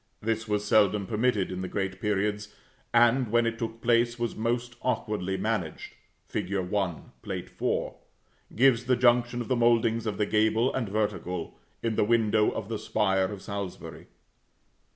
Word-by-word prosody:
This 115 Hz, +1 st, -2 dB
was 105 Hz, 0 st, -1 dB
seldom 105 Hz, -1 st, +3 dB
permitted 105 Hz, -2 st, 0 dB
in 90 Hz, 0 st, -4 dB
the 95 Hz, -, -3 dB
great 95 Hz, 0 st, -3 dB
periods, 105 Hz, 0 st, -1 dB, 0.4 s
and, 120 Hz, +1 st, +4 dB
when 120 Hz, +1 st, +3 dB
it 115 Hz, 0 st, -2 dB
took 115 Hz, 0 st, -4 dB
place, 120 Hz, 0 st, +2 dB
was 120 Hz, -1 st, -2 dB
most 120 Hz, +2 st, -2 dB
awkwardly 105 Hz, -6 st, -1 dB
managed. 105 Hz, -8 st, -3 dB, 0.3 s
Fig. 100 Hz, -1 st, -3 dB
1, 95 Hz, -2 st, -2 dB
Plate -, -, -6 dB
IV. -, -, 0 dB, 0.6 s
gives 125 Hz, 0 st, +4 dB
the 125 Hz, +1 st, +3 dB
junction 120 Hz, 0 st, +3 dB
of 120 Hz, -, -5 dB
the 130 Hz, -, +1 dB
mouldings 115 Hz, -1 st, +2 dB
of 105 Hz, -2 st, -2 dB
the 105 Hz, -, +1 dB
gable 110 Hz, +4 st, +2 dB
and 120 Hz, -6 st, -2 dB
vertical, 95 Hz, -5 st, -3 dB, 0.2 s
in 115 Hz, -2 st, -1 dB
the -, -, +4 dB
window 110 Hz, -1 st, +3 dB
of 100 Hz, -, -5 dB
the 110 Hz, -1 st, -3 dB
spire 95 Hz, -3 st, +1 dB
of 100 Hz, 0 st, -6 dB
Salisbury. 100 Hz, -2 st, -6 dB
110 Hz, 160 wpm, -28 LUFS, 100-120 Hz, 0.6 s, and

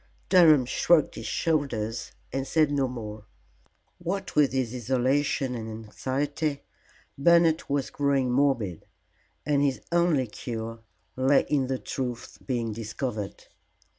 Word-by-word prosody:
Durham 160 Hz, -8 st, +6 dB
shrugged 160 Hz, +4 st, +3 dB
his -, -, -7 dB
shoulders 120 Hz, -9 st, -1 dB, 0.2 s
and 135 Hz, 0 st, -2 dB
said 155 Hz, -2 st, +3 dB
no 140 Hz, -2 st, +1 dB
more. 110 Hz, -4 st, -7 dB, 0.7 s
What 190 Hz, +3 st, -4 dB
with 150 Hz, -2 st, +4 dB
his 130 Hz, -3 st, -1 dB
isolation 130 Hz, +2 st, 0 dB
and 115 Hz, -2 st, -5 dB
anxiety, 140 Hz, +7 st, -3 dB, 0.6 s
Bernard 170 Hz, +1 st, +5 dB
was 140 Hz, -1 st, -1 dB
growing 140 Hz, -3 st, +1 dB
morbid, 125 Hz, -, 0 dB, 0.6 s
and 145 Hz, -1 st, +2 dB
his 140 Hz, -2 st, +1 dB
only 170 Hz, -6 st, +3 dB
cure 115 Hz, 0 st, -6 dB, 0.4 s
lay 135 Hz, +2 st, +3 dB
in 140 Hz, -3 st, +1 dB
the 130 Hz, 0 st, -1 dB
truth 125 Hz, -2 st, -5 dB
being 120 Hz, -4 st, -2 dB
discovered. 110 Hz, -1 st, -5 dB
135 Hz, 120 wpm, -27 LUFS, 120-145 Hz, 0.7 s, Durham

